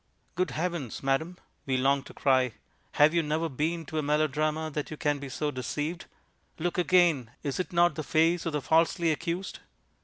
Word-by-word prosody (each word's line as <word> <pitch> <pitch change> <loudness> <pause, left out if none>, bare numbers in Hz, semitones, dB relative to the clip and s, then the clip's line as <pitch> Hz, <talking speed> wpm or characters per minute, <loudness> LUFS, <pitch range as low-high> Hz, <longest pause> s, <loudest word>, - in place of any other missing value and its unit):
"Good 185 0 0
Heavens, 165 -8 -3
madam," 160 +7 0 0.3
we 130 -1 +1
long 135 +2 +2
to - - -12
cry, 130 -3 +2 0.4
"have 150 +2 +5
you 170 - +3
never 155 +2 -1
been 160 +4 -2
to 155 +1 -3
a - - +1
melodrama 155 +1 0
that 150 0 -4
you 155 - -7
can 145 -1 0
be 140 -1 -7
so 150 +3 -2
deceived? 145 +6 -4 0.5
Look 175 +2 -1
again! 175 -9 +3
Is 140 +2 -2
it 185 - -2
not 175 0 +4
the 155 - -4
face 165 +3 +2
of 165 - -2
the 150 - -1
Falsely 165 +2 +3
Accused?" 170 +5 -3
155 Hz, 185 wpm, -28 LUFS, 145-170 Hz, 0.5 s, have